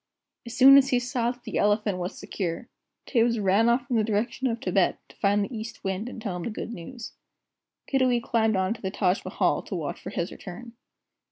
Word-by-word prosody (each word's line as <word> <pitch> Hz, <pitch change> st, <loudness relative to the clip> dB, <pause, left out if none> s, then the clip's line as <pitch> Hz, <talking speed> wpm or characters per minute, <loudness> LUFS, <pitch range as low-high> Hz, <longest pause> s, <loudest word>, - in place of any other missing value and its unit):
As 235 Hz, +1 st, -7 dB
soon 270 Hz, +1 st, +9 dB
as 275 Hz, 0 st, +1 dB
he 250 Hz, -, +3 dB
saw 245 Hz, -1 st, -1 dB
that 245 Hz, 0 st, -7 dB
the -, -, -3 dB
Elephant 205 Hz, -2 st, +1 dB
was 180 Hz, +2 st, -4 dB
secure, 185 Hz, +3 st, -4 dB, 0.4 s
Tibbs 235 Hz, -2 st, +2 dB
ran 205 Hz, +3 st, +3 dB
off 245 Hz, +3 st, +1 dB
in 245 Hz, -4 st, +1 dB
the 220 Hz, -, +3 dB
direction 225 Hz, +5 st, -1 dB
of 230 Hz, -2 st, -2 dB
Tibet, 270 Hz, -, +1 dB
to -, -, -17 dB
find 205 Hz, 0 st, +2 dB
the 245 Hz, -, -8 dB
East 220 Hz, +1 st, -7 dB
Wind 195 Hz, +4 st, -2 dB
and 250 Hz, -, -8 dB
tell 200 Hz, -5 st, -4 dB
him -, -, -5 dB
the -, -, -3 dB
good 230 Hz, +1 st, -6 dB
news. 230 Hz, +6 st, -8 dB, 0.7 s
Kiddiwee 255 Hz, -3 st, +2 dB
climbed 220 Hz, -2 st, +1 dB
on 190 Hz, +2 st, +1 dB
to 230 Hz, -, -13 dB
the 190 Hz, -, -2 dB
Taj 190 Hz, -1 st, 0 dB
Mahal -, -, 0 dB
to -, -, -6 dB
watch -, -, -4 dB
for -, -, -6 dB
his -, -, -3 dB
return. 230 Hz, +6 st, -9 dB
225 Hz, 215 wpm, -26 LUFS, 200-245 Hz, 0.7 s, soon